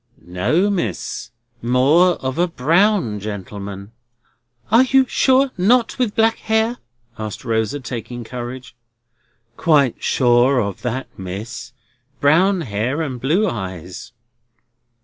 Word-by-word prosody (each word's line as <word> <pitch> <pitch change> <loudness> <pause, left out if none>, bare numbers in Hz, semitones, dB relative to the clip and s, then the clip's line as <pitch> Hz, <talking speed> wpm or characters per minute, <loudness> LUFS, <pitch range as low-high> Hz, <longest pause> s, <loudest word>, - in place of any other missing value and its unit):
"No, 105 - +1
Miss, 115 - -3 0.3
more 140 +9 +4
of 130 +4 -2
a 175 - +3
brown 165 - +1
gentleman." 100 0 -7 0.8
"You 260 +3 +5
are - - -11
sure 265 +1 +3
not 235 +6 +2
with 235 -5 0
black 225 0 +3
hair?" 220 +2 0 0.4
asked 110 +3 -6
Rosa, 115 +4 -1
taking 120 -1 -6
courage. 125 +1 -8 0.8
"Quite 145 -7 +3
sure 125 +1 +3
of 100 -5 -3
that, 125 +2 -3
Miss. 100 +6 -7 0.5
Brown 180 +6 +3
hair 125 +5 -2
and 130 -5 -5
blue 175 +11 +2
eyes." 95 - -6
130 Hz, 110 wpm, -20 LUFS, 110-185 Hz, 0.8 s, You